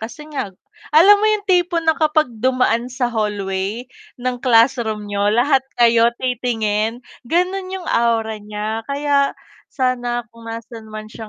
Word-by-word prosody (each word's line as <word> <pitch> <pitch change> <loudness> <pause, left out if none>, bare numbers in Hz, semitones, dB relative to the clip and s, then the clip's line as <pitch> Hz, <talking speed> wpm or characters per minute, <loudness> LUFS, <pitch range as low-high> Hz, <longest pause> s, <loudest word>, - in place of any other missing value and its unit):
kasi 235 +7 -8
nga 265 -8 -3 0.5
alam 390 +6 +8
mo 430 - +2
yung 425 -2 0
tipo 355 -3 +2
na 320 0 +3
kapag 310 0 +2 0.2
dumaan 250 -1 +1
sa 245 -1 -2
hallway 205 0 -2 0.3
ng 250 0 -3
classroom 230 -3 +2
niyo, 205 0 0
lahat 255 +5 +3 0.2
kayo 235 -1 +5
titingin, 230 -2 -1 0.2
ganun 370 +2 0
yung 375 -1 -6
aura 225 -5 0
niya. 210 +1 -4
Kaya 280 0 +1 0.3
sana 245 -3 -1
kung 230 0 -12
nasaan 225 -1 -8
man 215 0 -8
siya 220 -2 -9
240 Hz, 145 wpm, -19 LUFS, 220-280 Hz, 0.5 s, alam